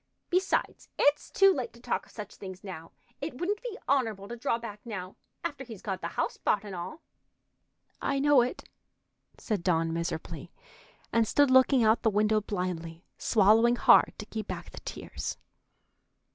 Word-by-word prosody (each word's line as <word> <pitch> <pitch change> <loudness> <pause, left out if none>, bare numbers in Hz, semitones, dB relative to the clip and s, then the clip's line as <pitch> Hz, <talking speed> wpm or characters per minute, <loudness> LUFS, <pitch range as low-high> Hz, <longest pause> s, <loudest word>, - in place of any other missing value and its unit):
Besides, 370 +2 0
it's 290 +1 +3
too 390 0 +5
late 255 -6 -4
to 235 - -16
talk 240 - -2
of - - -19
such 210 -2 -8
things 190 -1 -9
now. 165 -5 -8 0.3
It 295 -1 -4
wouldn't 405 +7 -1
be 475 -4 -6
honorable 225 -8 +1
to 240 - -5
draw 230 0 0
back 220 -3 -8
now, 190 -5 -6 0.3
after 285 -5 -4
he's 225 -6 -10
got 195 -4 -3
the 170 - -2
house - - 0
bought 205 - +1
and 205 -2 -7
all." 185 - -7 1.0
"I 275 - 0
know 285 -1 +5
it," 245 +1 -3 0.7
said 215 -6 -2
Dawn 165 -2 +1
miserably, 165 -1 -4 0.6
and 230 -1 +3
stood 285 +2 +4
looking 260 -1 +6
out 220 +1 +4
the 225 - +3
window 215 +1 +2
blindly, 180 -4 -4
swallowing 225 +3 +5
hard - - +6
to 210 - -7
keep 215 -1 -5
back - - -6
the - - -9
tears. - - -6
220 Hz, 170 wpm, -29 LUFS, 190-260 Hz, 1.0 s, looking